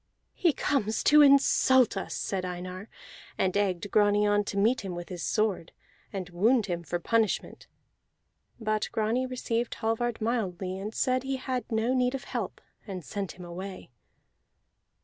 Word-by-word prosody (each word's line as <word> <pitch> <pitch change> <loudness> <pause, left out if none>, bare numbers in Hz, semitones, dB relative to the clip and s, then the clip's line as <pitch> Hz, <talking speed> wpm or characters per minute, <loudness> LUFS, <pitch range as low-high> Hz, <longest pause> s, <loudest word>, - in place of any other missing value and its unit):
"He 345 - +3
comes 250 -6 0
to 300 0 +7
insult 265 -3 +5
us," 195 - -4
said 190 -2 -2
Einar, 180 +2 -6 0.5
and 185 0 +1
egged 200 -1 0
Grani 205 0 +4
on 205 0 +3
to 200 - -4
meet 225 +6 +3
him 190 -3 -5
with 175 0 -7
his 180 -2 -6
sword, 210 -6 -1 0.4
and 190 -3 -4
wound 220 +6 +3
him 175 -2 -3
for 170 +1 -3
punishment. 220 +4 -1 0.9
But 215 -1 -1
Grani 225 +4 0
received 240 -2 -2
Hallvard 225 +1 -1
mildly, 190 -5 -2
and 205 +2 -4
said 255 0 +1
he 270 +1 -2
had 255 -2 -4
no 225 +3 +1
need 250 0 +1
of 270 - -5
help, - - -5 0.3
and 185 -5 -6
sent 200 +2 -4
him 180 - -11
away. 185 -2 -8
210 Hz, 155 wpm, -28 LUFS, 185-245 Hz, 0.9 s, to